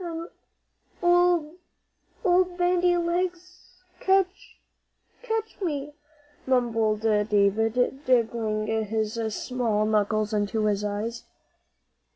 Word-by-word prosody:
"An' 335 0 -6 0.7
old 350 -2 +3 0.7
old 360 0 +3
Bandy 355 0 +2
Legs'll 360 +1 -4 0.2
catch 385 0 0 0.6
catch 445 -3 -4
me," 295 -5 -3 0.5
mumbled 225 -4 +1
David, 220 +4 +1
digging 225 -3 +1
his 220 0 -2 0.2
small 230 -5 -1
knuckles 215 0 +1
into 210 +1 0
his 205 -1 0
eyes. 210 +3 -4
245 Hz, 85 wpm, -26 LUFS, 215-355 Hz, 0.7 s, old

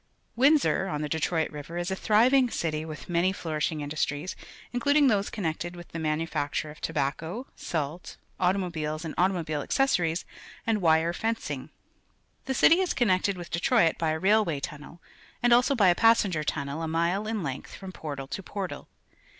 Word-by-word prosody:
'Windsor, 270 -6 +3
on 150 -5 -3
{\\Q_Detr 155 +2 -1
oit 160 -2 0
River, 150 +3 -7
is 175 +2 -2
a - - 0
thriv 220 +6 +3
ing 260 -3 +5
city 155 -7 -2
with 155 -1 -8
many 175 +2 +2
flourishing 155 -4 -2
industries, 145 +3 -2 0.4
including 285 +3 +4
those 205 -3 +1
connected 175 -3 -3
with 175 -1 -11
the 165 - -6
manufac 155 -2 -1
ture 155 - -2
of 150 - -15
tobacco, 160 - -2
salt, 160 +2 -4 0.2
automobiles 170 -4 -1
and 160 - -4
auto 185 +2 +2
mobile 155 -4 -2
accessories, 175 - +1 0.4
and 220 -3 +1
wire 165 0 +3
fencuig. 225 +5 -3 0.8
The 265 0 -2
city 335 +7 +6
is 375 -2 0
coimected 200 -4 +2
with 175 -1 -8
Detroit 170 0 +2
by 165 -2 +1
a 155 - 0
railway 190 -4 +2
tunnel 150 +4 -8 0.4
and 240 0 +5
also 250 +4 +4
by 200 -7 +5
a - - +6
passenger 205 -6 +3
tunnel 145 +1 -3
a 165 - -2
mile 170 +6 0
in 220 -4 -2
length 135 -2 -5
froiii 190 -1 -8
porta! 140 -5 -6
to 145 +8 -5
portal. 195 0 -6
175 Hz, 175 wpm, -27 LUFS, 155-210 Hz, 0.8 s, city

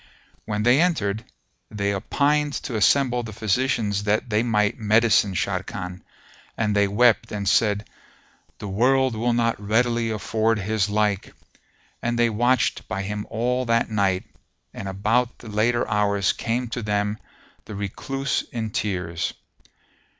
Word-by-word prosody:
When 105 0 -2
they 125 +6 +5
entered, 110 - 0 0.5
they 100 -1 -1
opined 145 +8 +1
to 125 - -4
assemble 125 +3 +3
the 115 -2 -7
physicians 105 -1 0
that 105 +3 0
they 105 +1 +3
might 105 -2 +1
medicine 110 -2 +3
Sharrkan, 90 +1 -3 0.6
and 105 -2 0
they 100 0 +4
wept 115 +4 +3
and 100 -2 -3
said, 105 0 +2 0.7
"The 105 - -7
world 130 +5 +2
will 120 +2 0
not 115 -2 0
readily 115 +2 +1
afford 110 +1 0
his 105 0 0
like!" 105 -2 0 0.7
and 120 0 -1
they 120 -1 +3
watched 120 +3 +1
by 95 +1 -3
him 105 +1 -4
all 125 +3 0
that 115 -1 +1
night, 95 -3 +1 0.5
and 100 - -6
about 110 +6 0
the 115 - -11
later 115 +3 +1
hours 100 -2 +1
came 120 +2 -2
to 120 - -4
them 105 0 -1 0.5
the 105 - -8
Recluse 135 +7 -2
in 110 -2 -3
tears. 90 -6 -2
110 Hz, 140 wpm, -23 LUFS, 105-120 Hz, 0.7 s, they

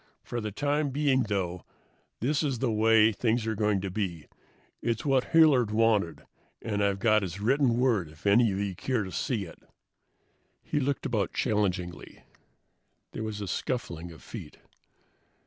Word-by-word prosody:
For 120 - -4
the 105 -1 -4
time 145 +5 0
being, 135 -1 +2
though, 90 -3 -2 0.6
this 140 +5 +1
is 140 -5 -1
the 120 0 0
way 110 0 +5
things 115 +1 0
are 110 - 0
going 105 -2 +1
to 95 -1 -4
be. 90 -6 -3 0.6
It's 115 +1 -2
what 135 -3 +2
Hilliard 150 -9 +5
wanted, 110 -6 +1 0.3
and 105 -2 -2
I've 100 -1 +1
got 110 +1 +3
his 95 -1 -5
written 125 +2 +2
word 115 -10 +1
if 75 +3 -18
any 110 +2 +5
of 95 - -2
you 100 -1 -2
care 115 +4 -1
to 95 - -7
see 110 -2 -2
it." 85 - -13 1.0
He 150 - -1
looked 140 0 -1
about 110 -6 -1
challengingly. 95 -5 -2 0.9
There - - -6
was 110 -1 -4
a 100 - -4
scuffling 90 -6 -3
of 80 - -14
feet. - - -9
110 Hz, 165 wpm, -28 LUFS, 100-125 Hz, 1.0 s, way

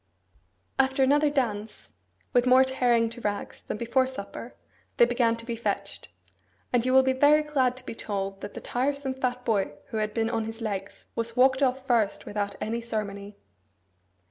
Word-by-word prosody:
After 265 0 +3
another 290 +3 +4
dance 220 -7 -2 0.4
(with 245 0 +3
more 255 +1 +7
tearing 245 -3 +2
to 240 +1 -8
rags 205 -2 -3
than - - -5
before 240 +3 +1
supper), 230 -1 -8 0.4
they 240 - +7
began 235 -1 +2
to 230 0 -10
be 235 -1 -3
fetched; 230 - -3 0.7
and 240 -2 +3
you 255 - +1
will 265 0 +6
be 260 0 +2
very 295 +3 +5
glad 260 -4 +1
to 255 - -12
be - - -5
told 195 -3 -4
that 205 - -7
the - - -6
tiresome 275 +2 -1
fat 250 -1 -2
boy 200 -9 +1 0.2
who 220 - -4
had 215 0 -2
been 225 0 0
on 225 -2 -1
his 225 +1 -7
legs 200 -3 -5
was 230 0 -3
walked 260 +1 +4
off 265 0 +1
first 230 -6 +1
without 205 -1 -3
any 230 +2 -2
ceremony. 205 -3 -5
235 Hz, 180 wpm, -27 LUFS, 215-260 Hz, 0.7 s, more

